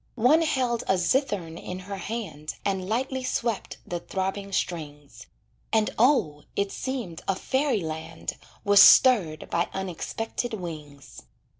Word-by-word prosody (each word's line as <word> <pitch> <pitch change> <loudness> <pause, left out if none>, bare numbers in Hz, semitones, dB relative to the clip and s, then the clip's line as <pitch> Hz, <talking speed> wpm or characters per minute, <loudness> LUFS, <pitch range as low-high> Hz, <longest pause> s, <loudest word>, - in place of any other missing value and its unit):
One 255 +8 +5
held 255 -7 +1
a 190 - +3
zithern 180 - 0
in 180 - -6
her 195 +1 -6
hand 190 -8 -5
And 190 -1 -1
lightly 260 +3 -1
swept 235 -4 -2
the 175 - -3
throbbing 195 +2 -3
strings; 145 - -4 0.4
And, 220 -1 +2
O! 220 - +3
it 200 0 0
seemed 240 -11 -4
a 195 - +2
fairy 265 +1 0
land 160 0 -5 0.3
Was 200 0 +7
stirred 195 - +6
by 170 +1 +1
unexpected 205 +5 -3
wings. 150 -7 -9
195 Hz, 130 wpm, -26 LUFS, 165-235 Hz, 0.4 s, Was